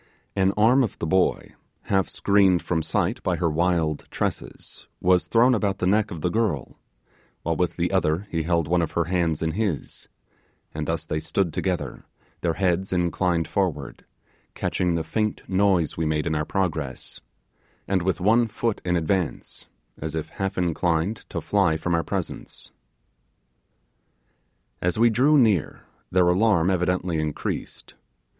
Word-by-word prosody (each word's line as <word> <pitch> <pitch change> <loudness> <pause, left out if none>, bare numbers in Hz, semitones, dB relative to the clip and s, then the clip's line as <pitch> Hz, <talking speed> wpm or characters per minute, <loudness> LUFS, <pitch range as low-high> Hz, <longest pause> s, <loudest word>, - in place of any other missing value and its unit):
An 95 0 +3
arm 120 +5 +5
of 115 - -3
the - - -3
boy, 95 +3 +1 0.3
half 95 -2 +1
screened 95 -3 +3
from 80 -2 0
sight - - -1
by - - 0
her 85 -3 0
wild 80 -2 0
tresses, - - -5
was 90 0 +3
thrown 120 +3 +4
about 100 -4 0
the 90 - -2
neck 105 +3 +2
of 85 -6 -7
the 90 - 0
girl, 105 - -1 0.6
while 85 0 0
with 90 +1 0
the 85 +1 0
other 95 -1 +1
he 80 - 0
held 85 -1 0
one 90 +1 +2
of 80 - -2
her 85 - +2
hands 85 -2 0
in 80 - 0
his; 95 -4 -3 0.7
and 75 -1 -4
thus 80 -1 -2
they 75 - -2
stood 85 +1 -1
together, 90 0 -3 0.4
their 85 -2 0
heads 95 0 0
inclined 90 -1 0
forward, 85 -8 -2 0.5
catching 90 -2 0
the 80 - -1
faint 105 +3 -2
noise 95 -4 +2
we 80 - 0
made 75 0 0
in 85 - 0
our 75 -1 -1
progress, 80 -10 -3 0.7
and 95 -2 +1
with 95 +1 0
one 115 +5 +3
foot 115 0 -2
in 90 -1 0
advance, 85 0 -2 0.3
as 80 0 -4
if 80 - -3
half 95 0 -4
inclined 90 +3 0
to - - -3
fly 80 0 +2
from 85 +2 -2
our 85 -1 +2
presence. - - -5 2.1
As 90 +2 0
we 115 +1 +5
drew 140 +7 +4
near, 110 - +2 0.3
their 90 -1 +3
alarm 90 -1 +3
evidently 90 -2 0
increased. 75 -1 -4
90 Hz, 155 wpm, -24 LUFS, 80-95 Hz, 2.1 s, arm